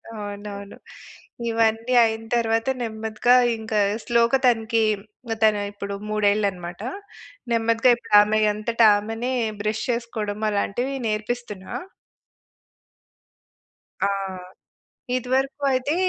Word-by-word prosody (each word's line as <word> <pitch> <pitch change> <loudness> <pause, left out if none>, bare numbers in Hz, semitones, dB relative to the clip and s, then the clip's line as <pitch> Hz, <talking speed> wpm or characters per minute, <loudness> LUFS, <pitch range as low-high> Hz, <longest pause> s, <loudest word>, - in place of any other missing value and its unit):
అవునవును. 205 -1 -7 0.7
ఇవన్నీ 225 +2 +1
అయిన 225 0 0
తరువాత 225 +1 +1
నెమ్మదిగా 220 +2 +1 0.2
ఇంక 220 0 -7 0.3
స్లో‌గా 235 +2 +3
తనకి 225 -1 +2 0.6
తను 210 -1 +4
ఇప్పుడు 200 0 -6
మూడేళ్ళన్నమాట. 200 -4 0 0.7
నెమ్మదిగా 230 +2 +3
ఇప్పుడు 230 -3 0
ఆమె 215 +1 +2
అంతట 230 +2 -2 0.2
ఆమెనే 225 +5 -3 0.3
బ్రష్ 215 +1 -2
చేసుకోవడం 220 -3 -3
అలాంటివి 245 +7 -1
నేర్పిస్తున్నా. 215 -2 -4 2.3
ఆ! - - +3 1.1
ఇదివరకూ 265 +3 -1
అయితే, 260 +3 0
225 Hz, 85 wpm, -23 LUFS, 210-235 Hz, 2.3 s, తను